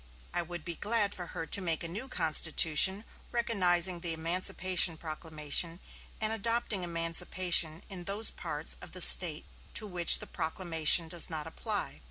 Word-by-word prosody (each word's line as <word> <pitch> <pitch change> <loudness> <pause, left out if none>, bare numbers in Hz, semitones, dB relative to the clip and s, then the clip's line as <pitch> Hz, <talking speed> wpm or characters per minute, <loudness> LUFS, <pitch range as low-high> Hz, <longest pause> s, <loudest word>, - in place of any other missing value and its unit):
"I 175 - -2
would 175 -1 -10
be 170 - -6
glad 210 +3 -2
for 175 -2 -10
her 165 - -8
to 200 - -2
make 165 -3 -3
a - - -4
new 210 +10 -7
constitution 160 - +3 0.3
recognizing 185 -7 +2
the 170 -1 -1
emancipation 175 +1 -1
proclamation 155 +1 -3 0.4
and 220 0 -2
adopting 225 -2 -3
emancipation 170 0 0
in 180 -3 -10
those 205 +4 0
parts - - -3
of - - -14
the - - +1
State - - +8 0.3
to 215 - -2
which 180 -4 +3
the - - -10
proclamation 165 0 -2
does 170 +1 +1
not 155 -2 -7
apply. 205 +6 -5
175 Hz, 155 wpm, -28 LUFS, 165-195 Hz, 0.4 s, State